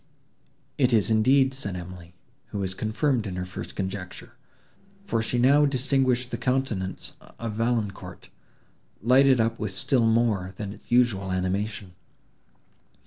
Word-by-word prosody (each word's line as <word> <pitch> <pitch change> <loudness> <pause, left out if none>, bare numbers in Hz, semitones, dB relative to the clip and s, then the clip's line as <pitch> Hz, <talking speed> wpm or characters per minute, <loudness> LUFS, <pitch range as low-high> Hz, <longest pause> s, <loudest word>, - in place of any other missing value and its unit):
"It 130 -2 +3
is 110 -2 +3
indeed," 130 +5 +4
said 105 -8 -5
Emily, 90 -1 -9 0.3
who - - -6
was 95 -2 -2
confirmed 115 +3 -1
in 90 - -5
her 90 0 -3
first 90 - -8
conjecture, 95 -1 -5 0.7
for 115 - 0
she 115 +2 -2
now 140 +4 +5
distinguished 130 -2 +1
the 115 - -4
countenance 120 -7 -2 0.3
of 115 -2 -4
Valancourt, 115 -3 -3 0.7
lighted 130 +2 +5
up 115 0 0
with 105 -4 -3
still 120 +1 +2
more 110 -5 +1
than 100 -1 -5
its 105 - -18
usual 120 -6 +2
animation. 95 +1 -2
110 Hz, 135 wpm, -26 LUFS, 95-125 Hz, 0.7 s, now